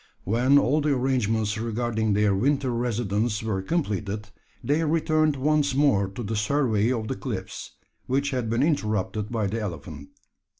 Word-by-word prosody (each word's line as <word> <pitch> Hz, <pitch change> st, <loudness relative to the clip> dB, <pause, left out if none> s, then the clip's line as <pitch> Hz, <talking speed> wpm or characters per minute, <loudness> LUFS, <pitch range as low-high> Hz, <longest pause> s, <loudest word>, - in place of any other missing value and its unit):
When 125 Hz, +7 st, +3 dB
all 145 Hz, +2 st, +3 dB
the 145 Hz, -1 st, +1 dB
arrangements 110 Hz, -4 st, 0 dB
regarding 110 Hz, -1 st, -1 dB
their 105 Hz, 0 st, +3 dB
winter 135 Hz, +5 st, +1 dB
residence 115 Hz, -2 st, -1 dB
were 105 Hz, -4 st, -1 dB
completed, 105 Hz, -, -2 dB, 0.3 s
they 150 Hz, +4 st, +1 dB
returned 155 Hz, -1 st, +2 dB
once 145 Hz, 0 st, +1 dB
more 135 Hz, -9 st, +3 dB
to 100 Hz, +6 st, -7 dB
the 110 Hz, +1 st, -3 dB
survey 110 Hz, 0 st, +1 dB
of 115 Hz, -4 st, -2 dB
the -, -, -2 dB
cliffs, -, -, -6 dB, 0.3 s
which 140 Hz, +2 st, 0 dB
had 125 Hz, -4 st, -2 dB
been 115 Hz, +4 st, +1 dB
interrupted 105 Hz, -, -1 dB
by 110 Hz, -3 st, 0 dB
the 110 Hz, +4 st, -2 dB
elephant. 75 Hz, -7 st, -7 dB
115 Hz, 155 wpm, -25 LUFS, 105-140 Hz, 0.3 s, When